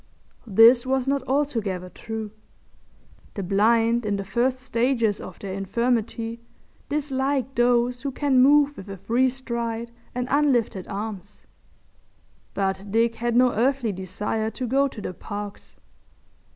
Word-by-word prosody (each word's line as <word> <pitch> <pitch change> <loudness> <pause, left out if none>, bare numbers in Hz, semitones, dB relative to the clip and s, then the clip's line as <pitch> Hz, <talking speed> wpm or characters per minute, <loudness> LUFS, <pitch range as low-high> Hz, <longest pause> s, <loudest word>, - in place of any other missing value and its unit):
This 230 +4 +7
was 265 0 0
not 275 0 +1
altogether 225 -10 -1
true. 220 +2 -6 1.0
The 200 - -3
blind 225 +5 +3
in 205 -1 -1
the 195 - -3
first 240 +6 0
stages 235 -4 0
of 185 - -9
their 195 -2 -6
infirmity 230 +3 -1 0.5
dislike 275 -2 -1
those 245 0 +2
who 280 - -2
can 270 -1 +2
move 290 +2 +5
with 195 - -9
a 195 - -6
free 245 +7 +2
stride 235 -3 -4 0.2
and 250 0 -2
unlifted 255 -9 +1
arms—but 200 -1 -7
Dick 230 +2 +2
had 235 0 -2
no 250 0 +5
earthly 250 0 +1
desire 200 +4 -3
to 255 +3 -5
go 270 +3 +2
to 235 -5 -9
the 185 - -5
Parks. 205 +2 -8
235 Hz, 130 wpm, -24 LUFS, 205-260 Hz, 1.0 s, This